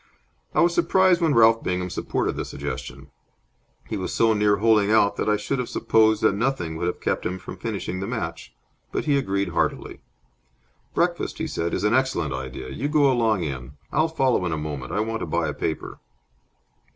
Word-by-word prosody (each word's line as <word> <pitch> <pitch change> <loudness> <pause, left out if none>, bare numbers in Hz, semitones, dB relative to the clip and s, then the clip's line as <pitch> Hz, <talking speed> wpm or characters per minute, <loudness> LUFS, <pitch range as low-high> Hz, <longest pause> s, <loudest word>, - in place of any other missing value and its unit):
I - - +4
was 170 0 +4
surprised 185 0 +3
when 160 -5 +2
Ralph 115 0 +5
Bingham 90 0 -2
supported - - -2
the - - -3
suggestion. - - -7 0.8
He - - -3
was - - -4
so 115 -1 +3
near 105 -1 +3
holing 105 -1 +3
out 105 -2 +4
that - - 0
I 105 - +3
should 130 +6 -2
have 125 - -3
supposed 110 -1 +3
that 110 - +4
nothing 100 -7 -1
would 85 +2 -2
have 90 - -3
kept - - -1
him 90 - -2
from 90 - -9
finishing 100 -4 -4
the 95 - -4
match. 65 - -4 0.4
But - - -2
he 145 -2 +3
agreed 100 -7 0
heartily. 85 - -2 1.0
"Breakfast," - - 0
he - - -2
said, 85 0 -2
"is 95 - -3
an 105 +2 +2
excellent 130 - +1
idea. 65 0 -6
You 140 - -3
go 145 -2 +4
along 115 -6 +1
in. 65 -3 -5 0.2
I'll 155 +2 +2
follow 135 - +1
in - - -2
a 80 - -1
moment. 75 -4 -5
I 105 - 0
want 115 +1 -2
to - - -4
buy 85 0 0
a 75 - -2
paper." 80 - -4
105 Hz, 200 wpm, -24 LUFS, 85-125 Hz, 1.0 s, Ralph